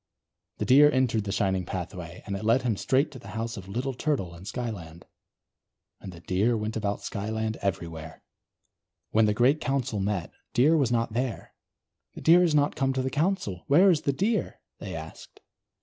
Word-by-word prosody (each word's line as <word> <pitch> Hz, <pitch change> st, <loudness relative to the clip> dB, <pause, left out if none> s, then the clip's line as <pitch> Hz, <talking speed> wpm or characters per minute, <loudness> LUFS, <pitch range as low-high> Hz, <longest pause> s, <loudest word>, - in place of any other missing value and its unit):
The -, -, -2 dB
Deer 145 Hz, +3 st, +7 dB
entered 125 Hz, -6 st, +1 dB
the 100 Hz, -, -3 dB
shining 95 Hz, -1 st, 0 dB
pathway, 90 Hz, -1 st, -6 dB
and 100 Hz, -, -3 dB
it 100 Hz, -, -5 dB
led 115 Hz, +4 st, +3 dB
him 120 Hz, -4 st, +1 dB
straight 135 Hz, +9 st, +1 dB
to 130 Hz, -, -10 dB
the 100 Hz, -, -13 dB
house 115 Hz, 0 st, -3 dB
of 95 Hz, -2 st, -9 dB
Little 125 Hz, +7 st, -3 dB
Turtle 125 Hz, -, -2 dB
in 85 Hz, +2 st, -12 dB
Skyland. 100 Hz, -9 st, -6 dB, 0.9 s
And 95 Hz, -, -8 dB
the 85 Hz, -1 st, -12 dB
Deer 105 Hz, +7 st, +1 dB
went 110 Hz, +1 st, -3 dB
about 105 Hz, -2 st, -2 dB
Skyland 110 Hz, +2 st, -3 dB
everywhere. 80 Hz, -4 st, -4 dB, 0.9 s
When 110 Hz, 0 st, +4 dB
the 105 Hz, -, +1 dB
great 130 Hz, +7 st, +3 dB
Council 135 Hz, -5 st, -1 dB
met, 95 Hz, -3 st, -2 dB, 0.2 s
Deer 145 Hz, +7 st, +5 dB
was 135 Hz, -7 st, +2 dB
not 115 Hz, -2 st, 0 dB
there. 125 Hz, 0 st, -3 dB, 0.6 s
"The -, -, -8 dB
Deer 170 Hz, +2 st, +6 dB
is 170 Hz, -4 st, +3 dB
not 145 Hz, 0 st, +2 dB
come 135 Hz, -2 st, +1 dB
to 130 Hz, 0 st, -1 dB
the 130 Hz, -, -2 dB
Council, 155 Hz, -, -1 dB
where 180 Hz, +7 st, +6 dB
is 160 Hz, -4 st, +1 dB
the 140 Hz, -, +1 dB
Deer?" 205 Hz, -, -1 dB, 0.2 s
they -, -, -6 dB
asked. -, -, -10 dB
115 Hz, 185 wpm, -27 LUFS, 100-135 Hz, 0.9 s, Deer